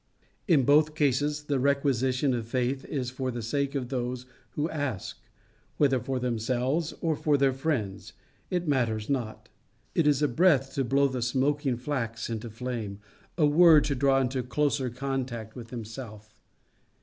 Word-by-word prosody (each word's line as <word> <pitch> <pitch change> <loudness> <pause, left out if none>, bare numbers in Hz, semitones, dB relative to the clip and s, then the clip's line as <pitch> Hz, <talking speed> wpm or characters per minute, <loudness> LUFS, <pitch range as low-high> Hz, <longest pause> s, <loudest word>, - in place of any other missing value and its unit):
In 155 -8 +4
both 150 +3 +4
cases, 145 +1 +1
the 145 -2 -1
requisition 135 -1 +1
of 115 -2 -3
faith 130 +2 -1
is 125 -4 -3
for 130 0 -3
the 120 -2 -4
sake 140 +4 -1
of 125 -3 -2
those 125 -1 -3 0.3
who 150 +1 -1
ask 145 - -4 0.6
whether 135 -3 +3
for 130 +2 -3
themselves 125 +6 -1
or 160 -2 +1
for 145 0 +2
their 135 -1 +3
friends, 130 -9 -3 0.4
it 180 -2 -1
matters 115 -5 0
not. 110 -5 -3 0.5
It 165 -3 +2
is 145 -1 +3
a - - +4
breath 135 -2 +3
to 135 - 0
blow 140 +3 +3
the 130 -2 -3
smoking 135 +2 0
flax 115 -4 -3
into 115 +1 -4
a - - -8
flame 115 -3 -5 0.4
a 155 - +4
word 155 0 +7
to 145 - 0
draw 135 0 +3
into 130 0 0
closer 130 +1 0
contact 125 -3 -4
with 120 -3 -9
himself. 110 -2 -8
130 Hz, 160 wpm, -28 LUFS, 120-145 Hz, 0.6 s, word